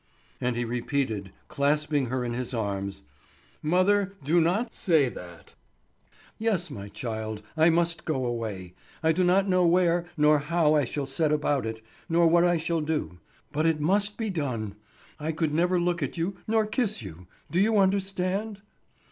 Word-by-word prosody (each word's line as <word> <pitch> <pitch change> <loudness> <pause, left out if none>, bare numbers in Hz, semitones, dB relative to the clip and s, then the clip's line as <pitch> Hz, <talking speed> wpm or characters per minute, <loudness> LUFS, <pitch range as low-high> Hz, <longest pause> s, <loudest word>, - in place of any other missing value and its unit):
And 125 -1 0
he 120 0 -1
repeated, 115 -4 -2 0.2
clasping 145 -1 +1
her 125 +1 -2
in 120 - -3
his 125 +1 -3
arms: 100 -2 -3 0.6
"Mother, 195 +4 +2
do 165 +5 +3
not 205 +8 0
say 160 -8 +2
that." 85 -6 -11 0.9
"Yes, 205 -6 0
my 100 0 -7
child, 110 -1 -5
I 160 +1 +5
must 170 0 +1
go 135 -5 -1
away. 110 -7 -4 0.3
I 160 - +4
do 180 +3 +1
not 190 +2 +3
know 185 -1 +3
where, 175 0 +3
nor 150 0 +5
how 155 +1 +2
I 150 -3 +3
shall 140 +4 -3
set 150 +3 +1
about 145 -5 +1
it, 110 0 -6 0.3
nor 170 +1 +4
what 170 +1 +5
I 175 -1 +3
shall 165 0 -1
do; 150 - -3 0.3
but 155 +3 +1
it 160 -2 +1
must 200 +6 +1
be 220 -3 -2
done. 125 - -3 0.5
I 155 +2 -2
could 160 -1 -1
never 175 +3 +2
look 175 0 0
at - - -3
you, 175 +4 -1
nor 220 0 +2
kiss 215 - -1
you, 90 -1 -10 0.2
do 175 +4 +2
you 215 +1 +3
understand?" 195 +1 0
155 Hz, 170 wpm, -27 LUFS, 125-180 Hz, 0.9 s, I